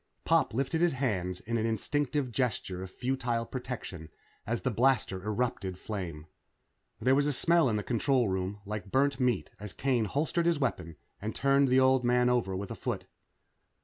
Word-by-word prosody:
Pop - - +2
lifted 140 +6 0
his 175 -3 +3
hands 95 -9 -1
in 115 +1 -2
an 110 - 0
instinctive 140 +4 -1
gesture 110 -7 -2
of 95 - -6
futile 120 0 -1
protection 115 -11 -6 0.4
as 115 +2 -1
the 130 - 0
blaster 115 -6 +2
erupted 105 -4 -2
flame. 90 -8 -5 0.7
There 130 - +3
was 145 +1 +3
a - - +2
smell 165 +1 +3
in 110 - 0
the 105 - -1
control 125 +1 +2
room 95 +2 -2
like 105 0 -5
burnt 140 +1 +2
meat 125 -6 +1
as 105 -2 -7
Kane 125 -4 +1
holstered 160 - 0
his 170 -2 +3
weapon 90 - -2 0.3
and 110 +2 -4
turned 140 0 +3
the 130 +1 +4
old 130 -1 +4
man 125 0 +3
over 115 -6 0
with 95 +1 -5
a - - -4
foot. - - -3
120 Hz, 180 wpm, -30 LUFS, 100-135 Hz, 0.7 s, the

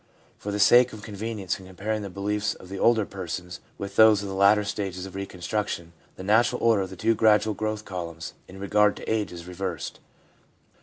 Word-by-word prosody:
For 105 - -4
the 100 - -2
sake 120 +4 +6
of 105 -1 -9
convenience 105 -3 -4
in 95 - -12
comparing 105 +4 -3
the 100 - -5
beliefs 105 +2 -1
of 90 - -14
the 95 0 -5
older 115 -3 +4
persons 90 -2 -6 0.2
with 100 - -6
those 110 -2 +7
of 100 - -5
the - - -4
later 100 +2 +5
stages 95 -3 -4
of 95 - -9
reconstruction, 95 -2 -4 0.2
the 95 - -8
natural 120 +5 +3
order 115 -3 +4
of 95 - -3
the 95 - -9
two 110 +5 +2
gradual 110 -1 +4
growth 110 +1 -3
columns 85 -3 -6
in 95 +1 -11
regard 105 +1 +3
to - - -10
age 110 -2 0
is 85 -1 -9
reversed. 90 -3 -5
100 Hz, 200 wpm, -26 LUFS, 95-110 Hz, 0.2 s, those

